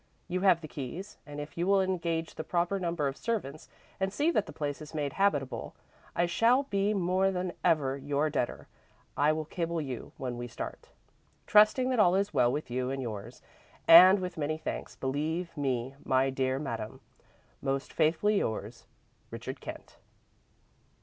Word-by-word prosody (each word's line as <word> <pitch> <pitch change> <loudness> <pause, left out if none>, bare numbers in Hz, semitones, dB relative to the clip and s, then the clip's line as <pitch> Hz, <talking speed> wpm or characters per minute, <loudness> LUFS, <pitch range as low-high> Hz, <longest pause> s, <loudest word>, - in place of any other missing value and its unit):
You 185 +1 -2
have 185 -4 +4
the 155 - -7
keys 155 +9 -7
and 145 0 -7
if 145 +1 -7
you 175 - 0
will 200 0 +5
engage 170 -3 -1
the - - -5
proper 175 +4 0
number 170 -5 -1
of 135 - -3
servants 155 - -4 0.3
and 190 0 0
see 295 - +1
that 215 - +1
the - - -7
place 145 -1 -4
is 155 +1 -10
made 145 -3 -2
habitable, 145 -10 0 0.4
I 175 - +3
shall 235 +9 +3
be 200 -5 0
more 185 +1 +2
than 180 -1 -2
ever 145 -6 +2
your 145 +2 0
debtor. 125 - -2 0.5
I 145 +2 +3
will 155 0 -2
cable 170 +1 -2
you 135 -6 -5
when 125 -2 -4
we 120 - -4
start. 115 - -7 0.6
"'Trusting 215 +5 +5
that 250 - +1
all 180 -3 +5
is 200 +1 0
well 120 - +4
with 145 -2 -4
you 125 +1 -1
and 135 0 -3
yours 115 -1 -6 0.4
and 180 +4 +10
with 180 -3 -5
many 155 +1 -1
thanks, - - -5
believe 155 +6 -2
me, 130 -3 -1
my 135 0 +2
dear 130 0 0
Madame, 115 -6 -5 0.6
"'Most 135 0 -2
faithfully 170 +6 +2
yours, 110 +2 -4 0.4
"'RICHARD - - -7
KENT.'" - - -9
160 Hz, 170 wpm, -30 LUFS, 135-185 Hz, 0.6 s, and